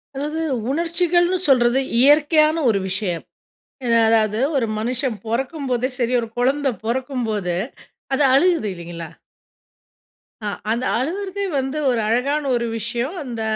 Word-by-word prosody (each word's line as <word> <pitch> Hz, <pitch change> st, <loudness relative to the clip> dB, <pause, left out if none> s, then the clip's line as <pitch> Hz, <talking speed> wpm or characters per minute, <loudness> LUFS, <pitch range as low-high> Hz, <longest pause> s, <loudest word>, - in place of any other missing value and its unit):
அதாவது 300 Hz, +4 st, -3 dB, 0.3 s
உணர்ச்சிகள்னு 345 Hz, +3 st, +2 dB
சொல்றது, 245 Hz, -1 st, +4 dB, 0.2 s
இயற்கையான 305 Hz, +3 st, +5 dB
ஒரு 205 Hz, -3 st, +2 dB
விஷயம். 185 Hz, -3 st, -2 dB, 0.6 s
அ -, -, -1 dB, 0.2 s
அதாவது 220 Hz, -1 st, +2 dB, 0.2 s
ஒரு 250 Hz, -4 st, +1 dB
மனுஷன் 250 Hz, +2 st, -2 dB
பொறக்கும்போது 255 Hz, +1 st, -1 dB
சரி, 245 Hz, -1 st, 0 dB
ஒரு 230 Hz, -, -5 dB
கொழந்த 270 Hz, +3 st, +1 dB, 0.2 s
பொறக்கும்போது 230 Hz, -7 st, -2 dB, 0.6 s
அது 270 Hz, -, +2 dB
அழுகுது 330 Hz, -3 st, +3 dB
இல்லைங்களா. 170 Hz, -1 st, -8 dB, 1.4 s
ஆ -, -, 0 dB, 0.2 s
அந்த 235 Hz, +3 st, -1 dB
அழுகுறதே 380 Hz, -, -3 dB
வந்து 270 Hz, +2 st, -2 dB
ஒரு 245 Hz, -2 st, +1 dB
அழகான 275 Hz, +7 st, +1 dB
ஒரு 235 Hz, -1 st, -1 dB
விஷயம். 235 Hz, -, -3 dB
அந்த 240 Hz, -4 st, -5 dB
255 Hz, 120 wpm, -21 LUFS, 230-295 Hz, 1.4 s, இயற்கையான